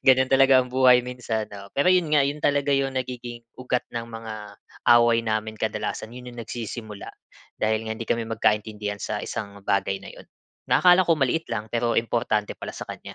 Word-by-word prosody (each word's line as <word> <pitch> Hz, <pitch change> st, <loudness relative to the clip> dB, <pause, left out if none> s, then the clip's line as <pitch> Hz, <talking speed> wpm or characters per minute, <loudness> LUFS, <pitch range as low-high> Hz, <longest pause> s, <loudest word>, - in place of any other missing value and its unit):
Ganun 130 Hz, 0 st, +5 dB
talaga 135 Hz, -1 st, +6 dB
ang -, -, -11 dB
buhay 125 Hz, -1 st, +5 dB
minsan 120 Hz, -3 st, -3 dB
'no. 100 Hz, -1 st, -9 dB
Pero 140 Hz, +6 st, +3 dB
yun 180 Hz, -3 st, +2 dB
nga, 145 Hz, -2 st, +5 dB
yun 145 Hz, +2 st, -2 dB
talaga 145 Hz, 0 st, +2 dB
yung 135 Hz, -1 st, 0 dB
nagiging 120 Hz, -2 st, -5 dB, 0.2 s
ugat 125 Hz, -1 st, -1 dB
ng 115 Hz, -1 st, -4 dB
mga 110 Hz, -3 st, -8 dB, 0.4 s
away 120 Hz, -1 st, +4 dB
namin. 110 Hz, 0 st, -1 dB
Kadalasan 110 Hz, +1 st, -3 dB
yun 125 Hz, 0 st, -9 dB
yung 120 Hz, -, -8 dB
nagsisimula, 110 Hz, -2 st, -7 dB, 0.5 s
dahil 110 Hz, +1 st, +1 dB
nga 110 Hz, -, -2 dB
hindi 115 Hz, -, -7 dB
kami 115 Hz, -1 st, 0 dB
magkaintindihan 105 Hz, -2 st, -1 dB
sa -, -, -3 dB
isang 100 Hz, 0 st, -6 dB
bagay 95 Hz, 0 st, 0 dB
na -, -, -10 dB
yun -, -, -13 dB, 0.5 s
na -, -, +5 dB
akala 180 Hz, 0 st, +7 dB
ko 170 Hz, -, +4 dB
maliit 145 Hz, +4 st, 0 dB
lang 110 Hz, -2 st, -3 dB
pero 120 Hz, 0 st, 0 dB
importante 115 Hz, -2 st, -1 dB
pala -, -, -6 dB
sa -, -, -6 dB
kanya. -, -, -8 dB
120 Hz, 190 wpm, -24 LUFS, 110-130 Hz, 0.5 s, akala